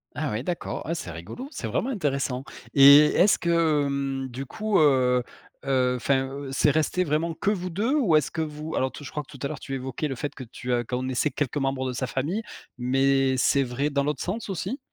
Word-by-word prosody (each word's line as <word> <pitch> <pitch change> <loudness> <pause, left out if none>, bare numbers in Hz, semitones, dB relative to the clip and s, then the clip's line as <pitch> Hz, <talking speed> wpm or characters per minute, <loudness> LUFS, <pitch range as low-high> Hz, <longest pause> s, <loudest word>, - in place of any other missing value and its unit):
Ah 145 -1 -2
oui 110 +3 -2
d'accord, 175 +4 -4
ah 165 - -1
c'est 125 - -6
rigolo, 90 - -8
c'est - - -5
vraiment 260 - -1
intéressant 140 - -1 0.3
et 140 +1 +9
est-ce 200 +3 +5
que, 165 -4 +2
hem, 135 -1 -2
du 130 +3 -6
coup, 215 - 0
heu 130 -4 +4 0.4
heu, 130 -2 +2
enfin, 130 +2 +1
heu, 140 +1 -7
c'est 140 +2 +3
resté 155 +5 +1
vraiment 160 +2 0
que 165 +5 0
vous 185 -3 -2
2? 210 - 0
Ou 210 - +3
est-ce 150 - +1
que - - -4
vous 155 0 -4
alors 130 - +1
tout 145 - -10
je - - -7
crois 150 - -4
que 140 - -19
tout 140 - -11
à - - 0
l'heure 150 -2 -6
tu 135 - -5
évoquais 130 +3 -3
le 135 - -3
fait 145 +3 -5
que 130 - -8
tu 125 +2 -5
as 120 -1 +2
connaissais 130 +4 -1
quelques 145 0 -2
membres 135 -1 -1
de - - -2
sa 130 +1 -2
famille, 150 - -2 0.4
mais 135 +1 +2
c'est 140 +2 +3
vrai 135 +3 -1
dans 140 -1 +1
l'autre 145 -1 -2
sens 215 +6 -4
aussi? 195 +8 -3
140 Hz, 230 wpm, -25 LUFS, 130-160 Hz, 0.4 s, et